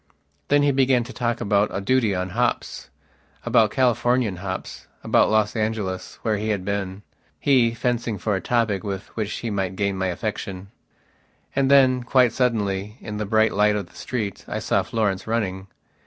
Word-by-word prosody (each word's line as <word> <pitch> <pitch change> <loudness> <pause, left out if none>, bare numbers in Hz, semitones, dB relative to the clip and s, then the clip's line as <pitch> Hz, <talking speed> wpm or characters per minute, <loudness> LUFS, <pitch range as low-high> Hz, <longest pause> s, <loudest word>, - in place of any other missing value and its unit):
Then 145 0 +4
he 145 - +4
began 130 -2 +3
to 130 +3 -10
talk 120 -2 -1
about 105 -2 +2
a 95 - -2
duty 115 -1 +1
on 90 0 -2
hops, - - -2 0.6
about 110 -1 +4
Californian 120 -4 +1
hops, 95 0 -6 0.2
about - - +3
Los 110 -1 +2
Angeles, 110 -4 -2
where 110 -2 +1
he 110 +2 -3
had 100 -3 -1
been. 100 0 -3 0.4
He 125 -5 +3
fencing 120 -2 -1
for 105 +2 -1
a 95 - -2
topic 110 -2 0
with 100 0 -6
which 110 -2 -2
he 115 - -4
might 95 -2 -2
gain 100 0 0
my 95 0 -1
affection. 95 0 -4 0.9
And 135 -1 +2
then, 130 -2 +5
quite 125 -1 +3
suddenly, 105 -4 -1
in 105 -1 -6
the 105 -1 -3
bright 110 +1 +3
light 105 +1 +3
of 100 -4 -4
the - - -22
street, 110 -6 -4
I - - -3
saw - - +1
Florence 105 -4 -1
running. 100 -4 -2
105 Hz, 175 wpm, -23 LUFS, 100-120 Hz, 0.9 s, then